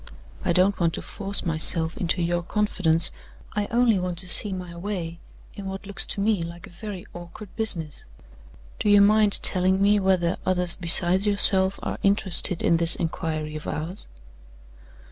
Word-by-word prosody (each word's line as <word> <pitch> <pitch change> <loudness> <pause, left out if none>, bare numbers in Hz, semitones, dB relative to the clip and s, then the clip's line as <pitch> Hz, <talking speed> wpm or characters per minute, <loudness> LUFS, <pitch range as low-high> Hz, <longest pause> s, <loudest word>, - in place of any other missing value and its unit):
"I - - -2
don't 185 +3 0
want 165 -2 -1
to - - -7
force 200 -1 -2
myself 160 0 +1
into 175 0 -2
your 175 +1 -3
confidence. 175 -4 +1 0.4
I 205 -1 -4
only 235 -3 0
want 180 -1 -6
to 185 +1 -3
see 200 +3 +4
my 180 -2 -9
way, 170 -3 -7 0.3
in 200 -1 -10
what 195 +1 -9
looks 200 0 -3
to - - -5
me 210 -3 -1
like 170 +1 -9
a - - -17
very 195 0 -10
awkward 175 +4 -13
business. 170 -10 -4 0.7
Do 210 - -2
you 205 0 +4
mind 210 0 +3
telling 185 0 +4
me 205 +1 +1
whether 185 -3 -1
others 180 -2 -1
besides 180 +2 +5
yourself 195 -2 +5
are - - -6
interested 195 -3 +2
in 170 - +1
this 165 0 +3
inquiry 155 -2 -6
of 155 - -9
ours?" 165 +6 -5
185 Hz, 165 wpm, -22 LUFS, 170-200 Hz, 0.7 s, besides